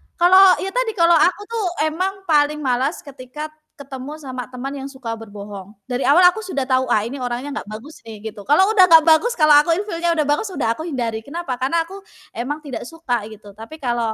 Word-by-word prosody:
kalau 375 +2 +6
ya 385 - -3
tadi - - -1
kalau 340 -3 +4
aku 355 +5 +2
tuh 455 -3 -2 0.2
emang 380 +5 -3
paling 300 0 +2
malas 265 +3 -1
ketika 280 +2 -9 0.3
ketemu 275 0 -8
sama 255 -3 -6
teman 255 +2 -5
yang 270 - -7
suka 260 -5 -7
berbohong, 205 -2 -10 0.2
dari 250 +1 -2
awal 300 +6 +6
aku 400 - -5
sudah 280 -8 -3
tahu, 260 0 +2
"Ah, 215 - +3
ini 240 +5 -5
orangnya 250 +2 -4
enggak - - -6
bagus 275 +9 -10
nih," 220 -2 -10
gitu. 205 -1 -13
Kalau 375 +8 +4
sudah 390 -4 +6
enggak 325 -2 +8
bagus, 370 +10 +4
kalau 305 -3 +6
aku 300 +3 +4
in 375 - -1
feel-nya 340 -1 0
sudah 305 -3 0
bagus 295 +9 +1
sudah - - -2
aku 315 - -6
hindari, 240 -8 -3
kenapa? 285 -3 -5
Karena 270 +7 0
aku 375 +4 -11 0.4
emang 290 +6 -4
tidak 280 -6 -7
suka, 250 -8 -3
gitu. 215 -1 -13
Tapi 265 +9 -11
kalau 240 -3 -1
285 Hz, 210 wpm, -20 LUFS, 245-335 Hz, 0.4 s, enggak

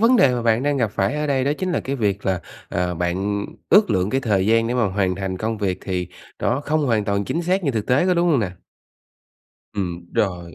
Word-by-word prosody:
vấn 235 +3 +5
đề 130 - +5
mà 120 - -2
bạn 115 +2 +2
đang 145 0 +1
gặp 115 -5 +1
phải 95 +7 +1
ở 150 0 -1
đây 135 -2 +1
đó 140 - +2
chính 185 -1 -1
là - - 0
cái 140 +1 -3
việc 100 -3 -1
là, 95 -2 +1 0.3
à, 90 0 -1
bạn 95 +4 -1 0.3
ước 205 - +6
lượng 95 0 +1
cái 135 - +1
thời 100 -5 +1
gian 115 +1 +3
để 125 - -1
mà 120 -3 +2
hoàn 95 -1 0
thành 95 -1 -3
công 110 +2 -2
việc 95 -2 -1
thì 90 -2 -3 0.3
nó 140 - 0
không 150 0 0
hoàn 110 -4 +1
toàn 100 0 0
chính 170 - -2
xác 185 +2 0
như 140 - +2
thực 110 -4 -2
tế, 140 +9 +3
có 180 - +3
đúng 175 0 +2
hông 140 -7 +3
nè? 95 - -1 1.2
Ừm, 90 -4 -4
rồi, 90 -4 -1
110 Hz, 250 wpm, -22 LUFS, 95-140 Hz, 1.2 s, ước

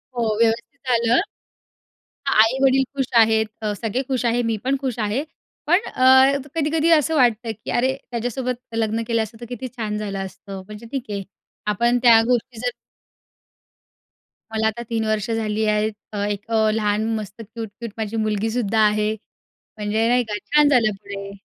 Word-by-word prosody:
हो, 225 -3 0
व्यवस्थित 230 +5 0
झालं. 235 0 +3 1.1
हां, - - +1
आई-वडील 265 +3 +3
खुश 270 -2 0
आहेत, 220 0 +4 0.2
अ, 210 -1 0
सगळे 230 +3 -1
खुश 260 -2 -1
आहे, 240 +1 +2
मी 230 -1 0
पण 270 +2 +1
खुश 260 -4 -3
आहे. 215 +5 0 0.4
पण 350 +5 +4
अ, 260 +2 +5 0.2
कधी-कधी 320 +1 +1
असं 320 -1 +4
वाटतं 240 -3 +2
की - - -4
अरे 260 +2 +1
त्याच्यासोबत 245 +2 -2 0.2
लग्न 225 0 0
केलं 230 -1 +1
असतं 220 +1 -8
तर 240 - -7
किती 245 +1 -5
छान 210 -3 -3
झालं 200 -2 -4
असतं. 195 0 -9
म्हणजे 210 +2 -10
ठीक 270 -3 -2
आहे. 200 -1 -3 0.5
आपण 235 +4 +2
त्या 230 -2 +7
गोष्टी 245 -1 0
जर 245 +1 0 1.8
मला 220 0 +1
आता 220 +2 -2
3 225 -1 -1
वर्ष 215 0 -1
झाली 220 -1 -1
आहेत. 215 0 +1 0.2
अ, - - -4
एक 205 0 -5
अ, 220 -1 +3
लहान 210 0 0
मस्त, 210 0 -6
क्यूट-क्यूट 225 +1 -8
माझी 220 0 -3
मुलगी 215 0 0
सुद्धा 225 -2 0
आहे. 210 0 +1 0.7
म्हणजे 215 +2 +1
नाही 245 +1 +3
का, 210 - -1
छान 295 +5 +3
झालं 240 -6 +4
पुढे. 200 0 -8
225 Hz, 165 wpm, -22 LUFS, 215-250 Hz, 1.8 s, त्या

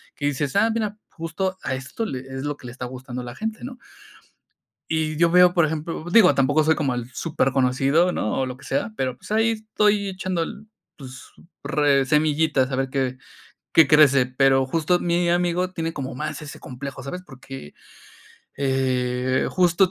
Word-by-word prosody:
que 145 - -4
dices: 145 +1 -2
"Ah, 225 +3 +4
mira, 215 -2 -2
justo 185 +3 -3
a 130 - -1
esto 130 - -5
le 130 -10 -4
es, 135 +1 -7
lo 145 0 -3
que - - -15
le 120 - -8
está 130 - -8
gustando 125 0 -7
a - - -8
la 120 - -8
gente, 220 0 -4
¿no?". 250 0 -8 1.1
Y 155 -1 -1
yo 170 0 +4
veo, 180 0 +6
por 170 -3 +4
ejemplo 160 +1 -4
digo, 210 -4 +7
tampoco 145 +3 +3
soy 160 +1 +4
como 135 -4 -1
el 120 0 -5
súper 155 -4 0
conocido, 135 +6 +2
¿no? 110 - -2
O 130 - +1
lo 125 0 -6
que - - -15
sea, 230 - -1
pero, 130 -1 -2
pues, - - -13
ahí 225 +1 +3
estoy 210 -2 +1
echando 185 -2 -3
el, 215 +5 -9 0.3
pues, 130 -2 -10 0.4
re 140 -2 +2
semillitas 150 -2 +2
a - - 0
ver 135 0 -1
qué, 130 -2 -1 0.6
qué 160 -4 +7
crece. 140 -4 +6
Pero 135 +1 +3
justo 165 +4 +1
mi 175 0 +1
amigo 175 +1 +1
tiene 165 -2 -3
como 135 -2 -5
más 150 +2 -4
ese 150 - -9
complejo, 135 +2 -8
¿sabes? 180 +7 -6
Porque, 135 - -11 0.8
eh, 130 -1 0
justo, 180 0 +3
150 Hz, 185 wpm, -23 LUFS, 130-175 Hz, 1.1 s, digo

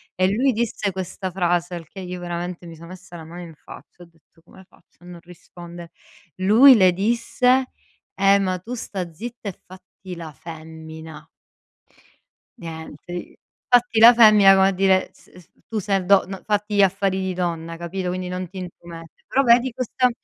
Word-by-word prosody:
E 185 0 +2
lui 260 +4 +2
disse 215 -3 -2
questa 185 0 -6
frase, 175 -1 -1
al 165 -2 -9
che 190 - -10
io 180 0 -7
veramente 175 0 -6
mi 165 - -10
sono 170 +2 -13
messa 180 -1 -12
la 165 - -9
mano 170 +2 -10
in 165 -3 -11
faccia, 175 - -15
ho - - -14
detto: 165 0 -29
"Come 190 0 -18
faccio 175 - -27
a - - -15
non 175 -1 -11
rispondere?" 175 0 -13 0.5
Lui 225 +8 +7
le 185 -4 +5
disse: 240 +5 +1 0.4
"Eh, 195 +1 +4
ma 185 -2 -1
tu 230 +7 -8
sta 185 -7 -6
zitta, 225 +4 -8
e 180 - -11
fatti 185 0 -12
la 165 -2 -8
femmina". 160 +1 -11 1.3
Niente 160 -3 -10
i 175 - -8 0.3
fatti 245 -2 +3
la 235 +2 +9
femmina 215 -4 +7
come 190 0 +4
a - - +2
dire 190 0 +2
s - - -23
s 180 -3 -17 0.2
tu 220 0 -3
sei 195 -2 -1
do 200 0 +4
no 195 -1 -8
fatti 210 0 -2
gli 200 - +4
affari 195 0 +1
di 190 -1 -3
donna, 165 -2 -4
capito 180 +2 -4
quindi 185 0 -4
non 180 0 -5
ti 190 - -12
intromettere. 170 -2 -11
Però 275 - +1
vedi, 240 +1 +4
questa 250 +1 0
185 Hz, 185 wpm, -22 LUFS, 170-205 Hz, 1.3 s, la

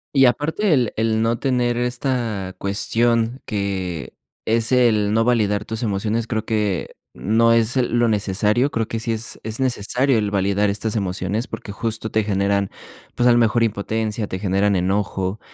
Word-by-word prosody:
Y 135 -1 +6
aparte 155 - +1
el 125 -5 +2
el 110 0 +1
no 115 +1 0
tener 125 -2 0
esta 120 -6 -2
cuestión 115 +4 0
que 95 - -3 0.3
es 115 +2 +1
el 110 -5 +3
no 115 +1 +3
validar 105 -4 +1
tus 110 +3 -4
emociones, 110 +2 -1
creo 110 -1 -2
que 105 -5 -1 0.2
no 115 +3 +2
es 115 +1 +2
lo 120 -1 +2
necesario, 105 +5 +1
creo 115 -3 -1
que 115 -2 -2
sí 115 +1 -1
es 110 +1 -4
es 110 +4 -4
necesario 125 +1 +1
el 105 -2 0
validar 100 +1 +1
estas 105 +2 -2
emociones, 95 +4 -2
porque 110 -2 -7
justo 110 +1 -3
te 110 -1 +1
generan, 100 -1 0 0.5
pues, 120 - +2
a - - +6
lo 120 - +4
mejor 115 0 +3
impotencia, 110 0 -2
te 95 - -4
generan 100 +1 +1
enojo 95 +1 -1
110 Hz, 165 wpm, -21 LUFS, 100-120 Hz, 0.5 s, Y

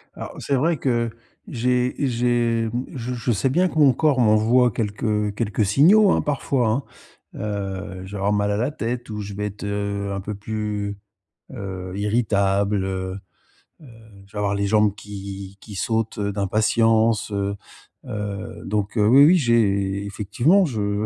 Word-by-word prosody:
Alors - - -8
c'est 140 - -1
vrai 160 +5 +1
que 120 -4 0 0.4
j'ai 125 +1 0
j'ai 120 -3 +1
mmh, 120 +2 -3
je 125 0 -4
je 120 0 -1
sais 110 +4 +1
bien 180 +8 +2
que - - -7
mon 145 -4 +6
corps 145 +1 +2
m'envoie 115 +2 +4
quelques 105 -1 -1
quelques 105 -2 0
signaux, 185 - +5
hein, - - +2
parfois, 135 -4 0
hein. 125 +6 0 0.5
Heu, 100 -2 -4
je 95 - -11
vais - - -4
avoir 100 +1 +1
mal 105 0 +1
à 100 - 0
la 125 +6 0
tête 120 -4 -4
ou 105 0 -4
je 100 0 -7
vais 105 +1 -3
être, 105 0 -9
heu, 100 -1 -2
un 100 - -3
peu 105 +2 -5
plus, 105 -1 -4 0.5
heu, 95 -2 -6
irritable, 100 -2 +1
heu 95 0 -3 0.6
heu, - - -14 0.4
je - - -25
vais - - -7
avoir 100 -1 0
les 100 0 0
jambes 105 -1 +3
qui 100 -2 -8
qui 105 - -10
sautent, 110 +3 -1
heu, 100 0 -1
d'impatience, 110 +2 +2
heu. 100 0 -1 0.5
Heu, 105 -1 -5
donc 105 +2 -2
heu, 105 -1 +4
oui, 135 +5 +7
oui, 175 +4 +6
j'ai 100 - +1
effectivement 120 - +2
je 105 -6 -1
105 Hz, 170 wpm, -22 LUFS, 100-120 Hz, 0.6 s, oui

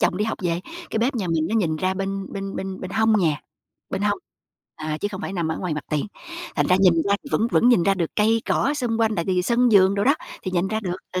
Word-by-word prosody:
chồng - - +2
đi 210 - 0
học 220 - -3
về, 170 0 0 0.3
cái - - -1
bếp 250 +4 +1
nhà 205 -6 -2
mình 160 -1 +1
nó 220 - -1
nhìn 170 -8 +1
ra 185 +3 0
bên 195 0 -4
bên 195 0 -5
bên 190 0 -5
bên 185 - -6
hông 220 +2 +3
nhà, 155 -5 +1 0.5
bên 195 - -2
hông, 210 - +1 0.6
à, 155 0 -4
chứ 205 - 0
không 190 -1 -6
phải 190 - -4
nằm 170 -4 -1
ở 160 - -2
ngoài 175 -4 -2
mặt 150 -3 -5
tiền. 150 +5 0 0.5
Thành - - +2
ra 180 - +4
nhìn 185 -3 +6
ra 200 - +4
thì 285 - -10
vẫn 225 - +2
vẫn 240 - +4
nhìn 240 -8 +5
ra 195 +2 +3
được 170 -4 -2
cây 225 +1 +3
cỏ 285 - +1
xung 240 -5 -1
quanh, 220 -1 +2
tại 170 -4 -1
vì 180 -1 +1
sân 240 +4 +3
vườn 195 -1 +6
đồ 200 0 0
đó, 280 - +5 0.3
thì 185 - -3
nhìn 180 +1 0
ra 220 +2 -1
được, 180 -4 -3 0.2
ừ, 185 - -1
195 Hz, 285 wpm, -23 LUFS, 175-220 Hz, 0.6 s, nhìn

